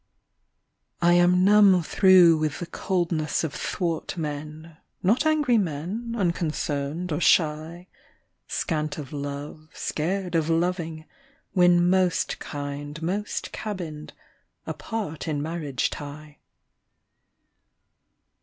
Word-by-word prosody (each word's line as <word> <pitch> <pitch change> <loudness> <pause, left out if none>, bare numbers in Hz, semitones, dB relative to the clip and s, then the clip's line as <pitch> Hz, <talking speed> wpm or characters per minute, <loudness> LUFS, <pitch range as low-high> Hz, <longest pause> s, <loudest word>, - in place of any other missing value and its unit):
SONNET. 175 0 +5
I - - +6
am 180 +1 +4
numb 200 -3 +6
through 180 -1 +6
with 155 -2 -1
the 175 - -5
coldness 170 -4 -1
of 155 -3 -3
thwart 170 -1 -3
men; 155 +1 -6 0.3
Not 235 - +3
angry 295 -7 +3
men, 195 +8 -3
unconcerned 165 -3 -2
or 150 +3 -1
shy, 165 +2 +2 0.6
Scant 155 -3 -2
of 145 -2 -7
love, 145 +2 -6
scared 180 +3 -2
of 165 -1 +1
loving, 165 -1 -1 0.5
when 175 -1 +5
Most 185 -1 +1
kind 145 +1 -6
most 200 +5 -3
cabinned 170 -8 -6 0.3
— - - -50
apart 205 -10 -5
in 150 -2 -1
marriage 150 -4 -2
tie. 145 0 -9
165 Hz, 105 wpm, -25 LUFS, 150-180 Hz, 0.6 s, I